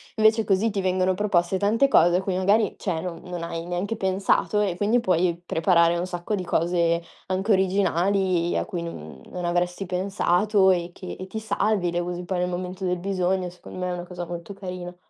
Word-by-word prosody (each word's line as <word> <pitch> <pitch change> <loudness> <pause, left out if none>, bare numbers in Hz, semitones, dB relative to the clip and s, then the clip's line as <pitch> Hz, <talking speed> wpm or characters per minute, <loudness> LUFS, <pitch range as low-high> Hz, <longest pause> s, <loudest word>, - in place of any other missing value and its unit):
Invece 220 0 +4
così 205 +2 +2
ti 195 -1 -1
vengono 185 0 +1
proposte 185 -2 +1
tante 225 +7 +3
cose 175 -8 +5
a 185 - 0
cui 190 -1 -1
magari, 200 +3 +2
cioè, 170 -5 -2
non 175 -1 -6
non 175 -2 -5
hai 165 0 -4
neanche 180 +5 -2
pensato 195 +1 +1
e 195 -4 0
quindi 210 +6 +2
puoi 180 -5 +1
preparare 170 0 +3
un 180 - -2
sacco 175 +3 -4
di 190 -3 -1
cose 170 0 +1 0.2
anche 190 +3 0
originali, 190 -2 +2
a - - -1
cui 175 -2 -4
non 75 - -8
non 180 -1 -5
avresti 175 +2 -1
pensato 190 +1 +2
e 175 -1 0
che 180 +1 -8
e 185 - -6
ti 220 +4 -5
salvi, 205 -3 0
le 175 - -1
usi 175 0 -4
poi 180 0 -2
nel 180 0 0
momento 185 +1 -4
del 180 0 0
bisogno. 185 0 -1
Secondo 180 - -12
me 180 0 -2
è 180 - -2
una 175 0 -5
cosa 175 -1 -6
molto 175 +2 -7
carina. 180 -2 -7
185 Hz, 205 wpm, -25 LUFS, 175-195 Hz, 0.2 s, cose